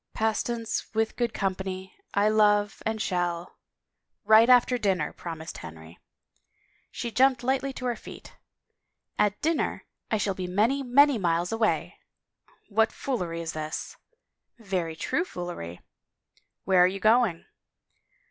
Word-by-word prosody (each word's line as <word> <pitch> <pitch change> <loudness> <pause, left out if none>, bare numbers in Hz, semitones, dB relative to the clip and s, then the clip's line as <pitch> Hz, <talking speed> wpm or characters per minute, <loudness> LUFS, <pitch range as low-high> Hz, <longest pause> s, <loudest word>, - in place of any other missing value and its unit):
Pastance 225 +1 -2
with 220 0 0
good 240 -2 0
company 190 -1 -4 0.2
I 200 +1 +3
love, 210 -1 +3
and 220 0 -2
shall 175 -3 -2 0.2
— - - -58
" - - -56
Right 225 +3 +7
after 250 0 +5
dinner," 190 -8 0
promised 165 -1 -7
Henry. 80 0 -11 0.9
She 235 - -5
jumped 255 0 +3
lightly 265 +2 0
to 255 - -7
her 245 -1 0
feet - - -12 0.4
" - - -34
At 210 0 +2
dinner 325 0 0 0.2
I 220 - +1
shall 205 -1 0
be 185 -1 -5
many, 220 +10 +1
many 275 0 +4
miles 170 -1 0
away." 225 -1 0 0.7
"What 220 +1 +2
foolery 180 -11 -3
is 165 -1 -4
this?" 155 0 -5 0.3
" - - -58
Very 185 -7 -3
true 310 - -1
foolery." 175 - -7 0.8
"Where 185 -2 +5
are - - +6
you 195 +2 -4
going?" 220 -6 +3
205 Hz, 140 wpm, -27 LUFS, 175-235 Hz, 0.9 s, Right